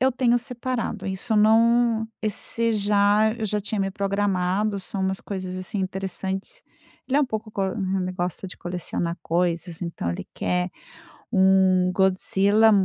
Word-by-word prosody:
eu 260 Hz, 0 st, +3 dB
tenho 245 Hz, -1 st, +3 dB
separado, 240 Hz, -4 st, -3 dB
isso 190 Hz, +4 st, -2 dB
não 225 Hz, +1 st, +4 dB, 0.2 s
esse 225 Hz, +2 st, 0 dB
já 205 Hz, +1 st, +3 dB
eu 225 Hz, -2 st, -3 dB
já 210 Hz, +1 st, -1 dB
tinha 210 Hz, +1 st, -2 dB
me 195 Hz, 0 st, 0 dB
programado. 200 Hz, 0 st, 0 dB
São 195 Hz, +1 st, -3 dB
umas 190 Hz, 0 st, -1 dB
coisas 185 Hz, -2 st, -5 dB
assim 185 Hz, +3 st, -4 dB
interessantes. 190 Hz, -, -4 dB, 0.5 s
Ele 270 Hz, -, +2 dB
é -, -, +4 dB
um -, -, +4 dB
pouco 220 Hz, -2 st, -4 dB
ele 190 Hz, -1 st, -1 dB
gosta 180 Hz, 0 st, -3 dB
de 180 Hz, -, -9 dB
colecionar 175 Hz, -1 st, -3 dB
coisas, 170 Hz, 0 st, -1 dB
então, 170 Hz, -, -3 dB
ele 85 Hz, -, -5 dB
quer 180 Hz, 0 st, -1 dB, 0.6 s
um 190 Hz, -2 st, +4 dB
Godzilla 195 Hz, +3 st, +4 dB
195 Hz, 145 wpm, -24 LUFS, 185-220 Hz, 0.6 s, não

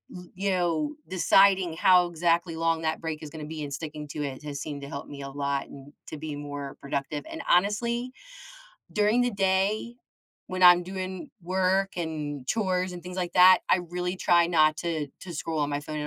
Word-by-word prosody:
l 180 Hz, 0 st, -9 dB
yo 190 Hz, -, 0 dB
deciding 190 Hz, -1 st, +4 dB
how 180 Hz, -1 st, +5 dB
exactly 170 Hz, 0 st, 0 dB
long 165 Hz, 0 st, 0 dB
that 160 Hz, 0 st, -1 dB
break 160 Hz, -2 st, -4 dB
is 150 Hz, -, -7 dB
gonna 150 Hz, 0 st, -8 dB
be 155 Hz, 0 st, -6 dB
and 140 Hz, -, -6 dB
sticking 150 Hz, -1 st, -6 dB
to 150 Hz, 0 st, -4 dB
it, 135 Hz, -1 st, -5 dB
has 145 Hz, -2 st, -5 dB
seemed 145 Hz, -2 st, -6 dB
to 140 Hz, -, -8 dB
help 140 Hz, -, -6 dB
me 140 Hz, -1 st, -9 dB
a 140 Hz, -, -6 dB
lot, 140 Hz, 0 st, -2 dB
and 140 Hz, +1 st, -13 dB
to 155 Hz, -, -7 dB
be 150 Hz, -1 st, -5 dB
more 145 Hz, -1 st, -6 dB
productive, 140 Hz, +1 st, -3 dB
and -, -, -6 dB
honestly, 235 Hz, +7 st, +1 dB, 0.8 s
during 210 Hz, +3 st, +3 dB
the 245 Hz, 0 st, +2 dB
day, 195 Hz, +4 st, 0 dB, 0.5 s
when 185 Hz, 0 st, -3 dB
I'm 180 Hz, 0 st, +8 dB
doing 185 Hz, -1 st, -6 dB
work, 190 Hz, +2 st, 0 dB
and 150 Hz, -5 st, -4 dB
chores, 185 Hz, -, 0 dB
and 175 Hz, -1 st, -8 dB
things 180 Hz, +1 st, -8 dB
like 180 Hz, -1 st, -2 dB
that, 185 Hz, +1 st, +8 dB
I -, -, +4 dB
really 180 Hz, +1 st, -3 dB
try 170 Hz, -1 st, +4 dB
not 155 Hz, -2 st, +4 dB
to 160 Hz, -4 st, -2 dB
to 175 Hz, -2 st, -8 dB
scroll 160 Hz, +1 st, -3 dB
on 145 Hz, 0 st, 0 dB
my 145 Hz, 0 st, -1 dB
phone 155 Hz, +1 st, -6 dB
at 150 Hz, -, -3 dB
170 Hz, 200 wpm, -27 LUFS, 150-185 Hz, 0.8 s, I'm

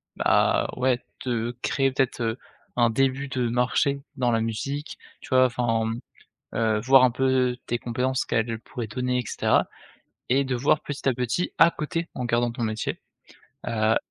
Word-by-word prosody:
bah, -, -, +2 dB
ouais, 125 Hz, -1 st, +2 dB, 0.3 s
de 120 Hz, -1 st, -2 dB
créer 135 Hz, -1 st, +1 dB
peut-être, 130 Hz, -2 st, 0 dB
heu, 115 Hz, +2 st, -1 dB, 0.4 s
un 120 Hz, -1 st, +4 dB
début 135 Hz, +3 st, +1 dB
de 125 Hz, -3 st, -1 dB
marché 125 Hz, +3 st, +1 dB
dans 125 Hz, -3 st, +1 dB
la 115 Hz, -, +2 dB
musique, 140 Hz, +7 st, -4 dB, 0.2 s
tu -, -, -12 dB
vois, 130 Hz, -1 st, +5 dB
enfin, 115 Hz, -2 st, 0 dB, 0.6 s
heu, 110 Hz, -2 st, +1 dB
voir 130 Hz, +3 st, +6 dB
un 125 Hz, -, +5 dB
peu 130 Hz, -1 st, +1 dB
tes 120 Hz, -, -1 dB
compétences, 125 Hz, +2 st, -1 dB
ce -, -, -8 dB
qu'elles 115 Hz, 0 st, 0 dB
pourraient 120 Hz, 0 st, -6 dB
donner 125 Hz, +3 st, -1 dB
et 125 Hz, -, -7 dB
cetera -, -, +1 dB, 0.6 s
et 135 Hz, +2 st, +4 dB
de 130 Hz, -1 st, -1 dB
voir, 140 Hz, +4 st, +2 dB
petit 145 Hz, -1 st, -5 dB
à -, -, +1 dB
petit, 125 Hz, +9 st, -1 dB
à 165 Hz, +1 st, +7 dB
côté, 165 Hz, +2 st, -3 dB
en 125 Hz, -, -3 dB
gardant 120 Hz, 0 st, +1 dB
ton 120 Hz, -, -7 dB
métier, 110 Hz, -1 st, -2 dB, 0.7 s
heu 110 Hz, -1 st, +2 dB
125 Hz, 175 wpm, -25 LUFS, 115-130 Hz, 0.7 s, à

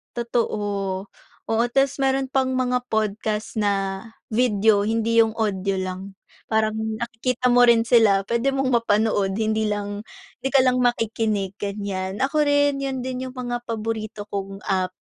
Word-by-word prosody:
Totoo. 205 Hz, -5 st, -2 dB, 0.4 s
Oo, 225 Hz, +1 st, +2 dB
tas 270 Hz, +1 st, +2 dB
meron 270 Hz, 0 st, +1 dB
pang 265 Hz, -1 st, 0 dB
mga 250 Hz, -1 st, 0 dB
podcast 215 Hz, 0 st, -1 dB
na 195 Hz, -2 st, -1 dB, 0.2 s
video, 215 Hz, -3 st, +3 dB
hindi 225 Hz, +1 st, +1 dB
yung 220 Hz, -, -2 dB
audio 195 Hz, -3 st, -1 dB
lang. 185 Hz, +1 st, -5 dB, 0.4 s
Parang 220 Hz, 0 st, +2 dB, 0.2 s
nakikita 240 Hz, +2 st, -1 dB
mo 245 Hz, 0 st, +6 dB
rin 235 Hz, -1 st, +5 dB
sila. 215 Hz, -5 st, +5 dB
Puwede 235 Hz, +4 st, +1 dB
mong 270 Hz, -1 st, 0 dB
mapanood, 215 Hz, -3 st, +2 dB
hindi 220 Hz, 0 st, +1 dB
lang, 205 Hz, 0 st, -4 dB, 0.4 s
'di -, -, +1 dB
ka 275 Hz, -, +5 dB
lang 255 Hz, 0 st, +2 dB
makikinig, 220 Hz, -4 st, 0 dB
ganyan. 200 Hz, -1 st, -4 dB
Ako 280 Hz, +3 st, +2 dB
rin, 285 Hz, -1 st, +2 dB
yun 265 Hz, -1 st, -2 dB
din 255 Hz, 0 st, -4 dB
yung 255 Hz, -, -10 dB
mga 245 Hz, -1 st, -4 dB
paborito 220 Hz, -2 st, -4 dB
kong 195 Hz, -1 st, -5 dB
app. 185 Hz, -1 st, 0 dB
220 Hz, 145 wpm, -23 LUFS, 205-250 Hz, 0.4 s, mo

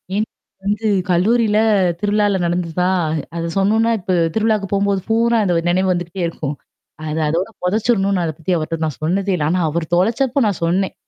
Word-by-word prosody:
ஏன் 215 Hz, -, +1 dB, 0.4 s
வந்து 210 Hz, +2 st, -1 dB, 0.2 s
கல்லூரில 210 Hz, +4 st, +2 dB, 0.4 s
திருவிழால 205 Hz, -1 st, +1 dB
நடந்துதுதான் 180 Hz, +1 st, 0 dB, 0.4 s
அத 170 Hz, 0 st, -2 dB
சொன்னும்னா 220 Hz, +4 st, +2 dB
இப்ப 185 Hz, 0 st, -4 dB, 0.2 s
திருவிழாவுக்கு 215 Hz, -2 st, +1 dB
போம்போது 200 Hz, -1 st, +1 dB
பூரா 230 Hz, +1 st, +3 dB
அந்த 180 Hz, -, +1 dB, 0.2 s
நினைவு 185 Hz, +1 st, +2 dB
வந்துகிட்டே 175 Hz, +1 st, -3 dB
இருக்கும். 150 Hz, -3 st, -4 dB, 0.5 s
அது 155 Hz, +1 st, -2 dB
அதோட 170 Hz, +7 st, -1 dB
புதைச்சரணும்னு 200 Hz, -1 st, +1 dB
அத 165 Hz, -, -1 dB
பத்தி 165 Hz, +2 st, -3 dB
அவர்ட்ட 165 Hz, +1 st, -3 dB
நான் 155 Hz, -, -5 dB
சொன்னதே 195 Hz, +4 st, 0 dB
இல்ல. 155 Hz, -, -2 dB
ஆனா 185 Hz, -, +1 dB
அவர் 165 Hz, +1 st, -2 dB
தொலைச்சப்ப 240 Hz, +8 st, +1 dB
நான் 200 Hz, -4 st, -2 dB
சொன்னேன். 185 Hz, +3 st, 0 dB
190 Hz, 155 wpm, -19 LUFS, 175-210 Hz, 0.5 s, பூரா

